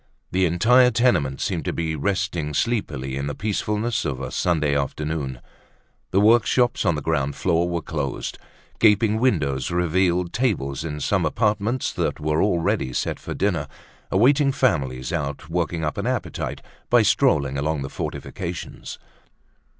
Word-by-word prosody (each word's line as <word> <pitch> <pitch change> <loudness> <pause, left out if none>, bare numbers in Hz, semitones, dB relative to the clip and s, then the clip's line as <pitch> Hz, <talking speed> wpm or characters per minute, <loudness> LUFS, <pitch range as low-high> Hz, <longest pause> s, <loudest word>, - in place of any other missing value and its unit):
The 95 0 +2
entire 125 +9 +5
tenement 100 - +2
seemed - - -1
to - - -1
be 80 -1 -2
resting 85 -2 -1
sleepily 65 - -1
in 70 +1 -3
the 75 - -4
peacefulness 110 +2 -1
of 70 -4 -3
a - - -5
Sunday 75 -5 +1
afternoon. 70 -2 -2 0.7
The 95 - +2
workshops 115 +1 +3
on 85 - +3
the 75 - -4
ground 70 -3 0
floor 85 -1 +1
were 85 -2 -2
closed. 75 -4 -4 0.4
Gaping 110 0 +4
windows 70 - +1
revealed 90 0 +1
tables 85 - -1
in 75 -2 -5
some 95 +4 +1
apartments 105 +7 0
that - - -1
were 75 +1 0
already 85 -9 +1
set - - -2
for - - -6
dinner, 85 -7 0 0.4
awaiting 135 +8 +4
families 65 - 0
out 75 +2 -4
working 85 -1 -1
up 75 - -3
an 100 - -2
appetite 130 -1 -3 0.3
by - - +5
strolling 70 -2 +2
along 75 -1 -1
the - - -4
fortifications. 90 +4 -6
85 Hz, 145 wpm, -23 LUFS, 75-105 Hz, 0.7 s, entire